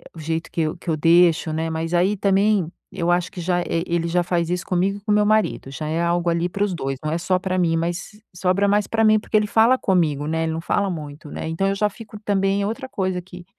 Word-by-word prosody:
o - - -10
jeito 160 +1 -3
que 165 - -1
eu 155 +1 -1
que - - -19
eu 160 - +2
deixo, 165 0 +4
né. 160 +1 -1
Mas 160 +1 -3
aí 185 +4 +2
também 195 -2 +2 0.2
eu 170 0 -1
acho 175 +2 0
que 185 - -7
já 175 +1 0
eh, 165 -1 -1
ele 170 -1 0
já 175 +1 +1
faz 170 -1 -1
isso 180 -1 -2
comigo 190 +2 0
e - - -25
com 210 +1 -2
meu 210 0 +4
marido, 210 -10 +1
já 150 +2 -5
é 160 +2 -1
algo 170 0 +1
ali 170 +1 +1
para 200 +3 -1
os 205 -2 0
2, 135 -4 -3
não 155 - -1
é 165 - 0
só 185 +2 0
para 185 0 -2
mim, 165 -2 +2
mas 170 +4 -3 0.2
sobra 185 +3 +1
mais 205 0 +2
para 225 0 +1
mim, 215 0 +5
porque 215 - -5
ele 210 - +1
fala 230 +4 +4
comigo, 155 -6 +1
né, 160 +1 0
ele 160 - -1
não 160 - -3
fala 200 +3 0
muito, 150 -2 -8
né, - - -5
então 180 +4 0
eu 195 - +1
já 210 +1 +1
fico 210 0 -11
também 195 0 +1
é - - 0
outra 260 +5 -4
coisa 185 -4 -2
que 180 0 -12
175 Hz, 270 wpm, -22 LUFS, 165-200 Hz, 0.2 s, mim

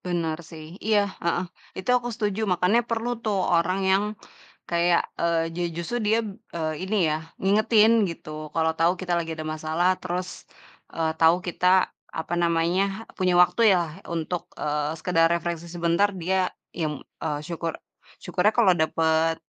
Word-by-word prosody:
Benar 170 -3 -2
sih, 155 -2 -9 0.2
iya, 215 -1 +4 0.2
heeh. 170 +1 0 0.3
Itu 190 - -2
aku 245 -1 -2
setuju, 210 -2 -2
makanya 180 +6 +3
perlu 230 +1 -1
tuh 215 -3 0 0.2
orang 170 +3 +2
yang 195 +2 +3 0.6
kayak, 170 0 +3 0.2
eee, 165 -1 +1
ju 175 - -4 0.2
justru 170 +8 -3
dia, 220 +2 +3 0.4
eee, 160 -1 -1
ini 205 +3 -1 0.2
ya, - - +1 0.3
ngingetin 215 +3 +4 0.2
gitu, 165 -2 -9 0.3
kalo 160 0 +3
tau 165 +2 +4
kita 180 -2 -3
lagi 165 -1 -3
ada 155 0 -5
masalah, 160 +3 0
terus, 180 0 -3 0.7
eee, 160 -1 +1
tau 165 +1 +6
kita 180 +1 -1 0.5
apa 165 - -3
namanya, 170 +2 +2 0.4
punya 185 -1 +2
waktu 180 - +1 0.2
yalah, 170 -3 -1 0.2
untuk, 170 +2 -2 0.2
eee, 150 0 -1
sekedar 165 0 +3
refreshing 170 0 -3
sebentar, 170 +4 +2
dia 190 +3 +1 0.4
yang 155 -3 -2 0.3
eee, 150 -2 -1
syukur 170 -1 -3 0.5
syukurnya 180 +4 +2
kalau 205 -6 +6
dapet 160 0 +2
170 Hz, 150 wpm, -25 LUFS, 165-190 Hz, 0.7 s, tau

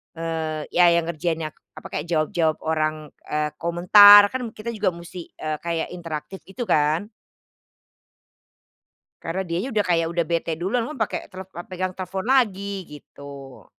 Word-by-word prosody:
eee, 160 -2 -3
ya 175 0 +5
yang 170 - +2
ngerjainnya, 160 -1 -3 0.2
apa, - - -9
kayak 150 - -4
jawab-jawab 160 0 0
orang, 155 -1 -2 0.2
eee, 150 0 -1
komentar, 205 +4 +8
kan 255 -2 -3
kita 225 +2 -5
juga 205 -5 -1
musti, 170 0 -9
eee, 155 -1 -4
kayak 170 -1 -3
interaktif 165 0 -7
gitu 195 +6 -5
kan. 155 +1 +1 2.1
Karena 180 +4 -3
dianya 175 +9 -2
udah 210 - +2
kayak 165 -2 +2
udah 170 0 0
bete 170 -1 -1
duluan, 195 +8 -1
memang 300 +1 -8
pake 220 - -2
tele 190 0 -8
eee, 175 -2 -10
pegang 185 0 -3
telfon 190 +2 -5
lagi 200 -7 +1
gitu. 140 -2 -12
170 Hz, 150 wpm, -23 LUFS, 155-195 Hz, 2.1 s, komentar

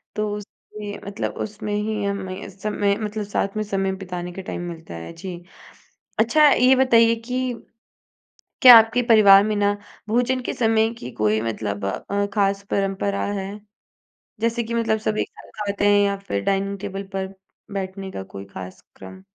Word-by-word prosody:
तो 215 0 -1
उसमें 210 0 -9
मतलब 200 +1 -4
उसमें 210 0 -6
ही 210 0 -2
हमें 195 -1 -4
समय 200 +1 -1
मतलब 215 -1 -3
साथ 200 0 -2
में 215 - 0
समय 195 -2 -1
बिताने 180 -1 -5
का 190 - -6
टाइम 185 - -5
मिलता 165 - -10
है 80 - -7
जी। 175 +2 -7 0.8
अच्छा 290 +7 +5
ये 255 +1 +5
बताइए 230 -3 +5
कि 255 0 -1 1.1
क्या 245 -2 +12
आपके 225 +2 +2
परिवार 200 -3 +8
में 215 -1 0
ना, 205 0 +1 0.3
भोजन 245 +3 +1
के - - -3
समय 225 -1 +2
की 125 - -7
कोई 110 0 +2
मतलब 105 -3 -3
अ, 200 - -2
खास 200 -1 +1
परंपरा 195 0 0
है? 195 -1 -4 0.9
जैसे 230 +1 0
कि 230 +1 -4
मतलब 225 -1 +1
सब 215 0 -1
एक - - -1
साथ - - -16
खाते 205 0 0
हैं 205 0 +5
या 200 0 0
फिर 100 - -3
डाइनिंग 195 0 0
टेबल 200 -1 -5
पर 190 0 -3 0.4
बैठने 195 0 -5
का - - -5
कोई 95 +1 -9
खास 95 0 -8
क्रम? 190 0 -12
200 Hz, 165 wpm, -23 LUFS, 190-220 Hz, 1.1 s, क्या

